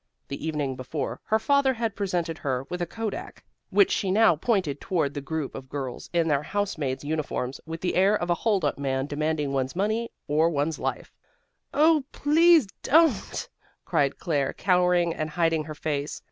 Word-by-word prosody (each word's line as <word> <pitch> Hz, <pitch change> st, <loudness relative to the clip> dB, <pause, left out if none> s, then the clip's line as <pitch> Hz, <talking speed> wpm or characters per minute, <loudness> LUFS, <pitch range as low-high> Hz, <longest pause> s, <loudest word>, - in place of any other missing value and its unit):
The 140 Hz, -, -6 dB
evening 145 Hz, -4 st, -2 dB
before, 130 Hz, +4 st, -4 dB
her 220 Hz, -, +2 dB
father 270 Hz, +3 st, +2 dB
had 225 Hz, -3 st, -2 dB
presented 175 Hz, -5 st, -2 dB
her 130 Hz, -2 st, -2 dB
with 180 Hz, 0 st, -3 dB
a 175 Hz, -, -1 dB
kodak, 225 Hz, -, -5 dB, 0.3 s
which 400 Hz, -, +4 dB
she 195 Hz, -, 0 dB
now 215 Hz, -2 st, +5 dB
pointed 170 Hz, -, 0 dB
toward 160 Hz, -6 st, 0 dB
the 145 Hz, -, -4 dB
group 150 Hz, 0 st, -4 dB
of 130 Hz, -, -9 dB
girls 135 Hz, -3 st, -5 dB
in 170 Hz, -1 st, +1 dB
their 145 Hz, -3 st, +2 dB
house 205 Hz, +5 st, -2 dB
maid's 135 Hz, -4 st, -3 dB
uniforms, 145 Hz, -4 st, -3 dB
with 165 Hz, 0 st, -6 dB
the 180 Hz, -, 0 dB
air 195 Hz, +3 st, +4 dB
of 175 Hz, -3 st, -1 dB
a -, -, +6 dB
hold 200 Hz, +1 st, 0 dB
up -, -, -1 dB
man, 135 Hz, -1 st, -1 dB
demanding 150 Hz, -1 st, -1 dB
one's 135 Hz, +1 st, -1 dB
money 220 Hz, +5 st, 0 dB, 0.2 s
or 155 Hz, +3 st, +3 dB
one's 150 Hz, 0 st, -1 dB
life. -, -, -3 dB, 0.6 s
"Oh, 310 Hz, +1 st, +4 dB
don't 270 Hz, -, -26 dB
please," 320 Hz, -2 st, +5 dB, 1.2 s
cried 145 Hz, -5 st, +1 dB
Claire, 145 Hz, -6 st, -1 dB
cowering 180 Hz, -2 st, +2 dB
and 155 Hz, -1 st, -3 dB
hiding 165 Hz, -1 st, +1 dB
her 155 Hz, 0 st, -7 dB
face. 145 Hz, -1 st, -3 dB
165 Hz, 180 wpm, -26 LUFS, 145-205 Hz, 1.2 s, a